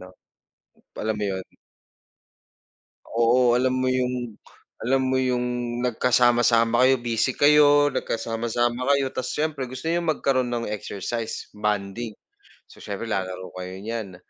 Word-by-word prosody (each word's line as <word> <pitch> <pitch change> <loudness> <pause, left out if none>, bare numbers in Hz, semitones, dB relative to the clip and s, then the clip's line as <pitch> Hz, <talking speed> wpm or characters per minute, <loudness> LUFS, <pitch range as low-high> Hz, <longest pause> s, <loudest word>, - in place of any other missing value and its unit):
'no? 90 - -11 0.9
Alam 110 0 -1
mo 105 - -2
yun. 95 - -7 1.6
Oo, 120 +1 +3
alam 130 +1 +2
mo 130 - +1
yung 125 -3 -1 0.4
alam 135 +4 +1
mo - - +2
yung 125 -1 -1
nagkasama-sama 120 0 +3
kayo 135 +1 +6
busy 120 +2 0
kayo, 145 -1 +5
nagkasama-sama 120 +2 -1
kayo 135 -1 +1
tas 125 -1 -3
siyempre 150 -3 -2
gusto 130 +5 -6
niyong 170 -1 -1
magkaroon 130 -4 +1
ng 115 -2 -2
exercise, 110 +3 -5
bonding, 105 +2 -2 0.6
so, - - -17
siyempre 105 +3 -5
lalaro 95 -2 -3
kayo 90 0 -6
niyan 110 -4 -5
120 Hz, 125 wpm, -24 LUFS, 110-130 Hz, 1.6 s, kayo